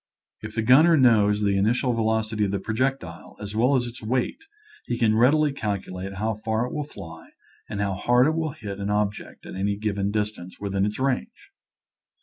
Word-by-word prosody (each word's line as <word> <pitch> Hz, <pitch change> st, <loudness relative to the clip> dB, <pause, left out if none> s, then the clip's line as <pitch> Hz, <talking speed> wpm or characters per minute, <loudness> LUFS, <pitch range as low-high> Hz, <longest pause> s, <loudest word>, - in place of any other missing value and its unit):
If 110 Hz, 0 st, -8 dB
the 110 Hz, -, 0 dB
gunner 155 Hz, +8 st, +6 dB
knows 105 Hz, -5 st, +4 dB
the 100 Hz, -1 st, +2 dB
initial 120 Hz, +6 st, +1 dB
velocity 110 Hz, -1 st, 0 dB
of -, -, -1 dB
the 100 Hz, -, -1 dB
projectile 110 Hz, -4 st, -3 dB
as 105 Hz, 0 st, -7 dB
well 125 Hz, +5 st, +3 dB
as 125 Hz, -2 st, +1 dB
its 120 Hz, 0 st, -9 dB
weight 125 Hz, -, -2 dB, 0.4 s
he 120 Hz, -, -2 dB
can 110 Hz, -2 st, +3 dB
readily 145 Hz, +6 st, +4 dB
calculate 100 Hz, -4 st, -4 dB
how 110 Hz, +3 st, -1 dB
far 110 Hz, +1 st, 0 dB
it 125 Hz, -, -6 dB
will 150 Hz, -, -3 dB
fly 80 Hz, -, -11 dB, 0.4 s
and 100 Hz, -, -4 dB
how 100 Hz, -1 st, 0 dB
hard 120 Hz, +6 st, +3 dB
it 155 Hz, -, +2 dB
will 160 Hz, -3 st, -2 dB
hit 100 Hz, -9 st, -7 dB
an 100 Hz, 0 st, -3 dB
object 105 Hz, 0 st, -2 dB
at -, -, -8 dB
any 100 Hz, +2 st, -1 dB
given 100 Hz, -2 st, -1 dB
dis 105 Hz, 0 st, 0 dB
tance 90 Hz, -3 st, -12 dB
within 100 Hz, 0 st, 0 dB
its 105 Hz, -, -4 dB
range. 220 Hz, -, -3 dB
110 Hz, 195 wpm, -25 LUFS, 100-125 Hz, 0.4 s, gunner